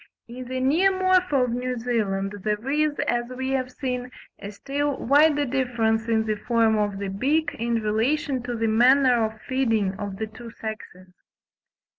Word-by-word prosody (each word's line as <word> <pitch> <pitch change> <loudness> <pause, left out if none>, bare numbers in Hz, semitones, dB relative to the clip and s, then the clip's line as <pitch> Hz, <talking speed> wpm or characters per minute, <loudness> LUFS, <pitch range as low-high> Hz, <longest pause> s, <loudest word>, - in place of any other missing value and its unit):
In 250 +2 -8
the 255 +1 -4
Neomorpha 365 +1 +3
of 250 - -1
New 250 +1 -2
Zealand, 205 -5 -1
there 210 +4 -2
is, 300 0 +1
as 240 0 0
we 260 0 -2
have 255 -1 -1
seen, 250 -2 -4 0.3
a 200 - -7
still 280 +6 -2
wider 290 +2 +3
difference 240 -4 0
in 220 -1 +1
the 215 -1 -1
form 230 -2 +3
of 205 -2 -1
the 200 0 -4
beak 290 +10 0
in 235 +1 0
relation 255 +6 0
to 245 0 -4
the 225 0 -1
manner 245 +2 +4
of 220 0 -3
feeding 225 -7 +1
of 200 -2 -5
the 220 - -2
two 230 +2 -11
sexes. 185 -4 -8
245 Hz, 165 wpm, -24 LUFS, 220-270 Hz, 0.3 s, manner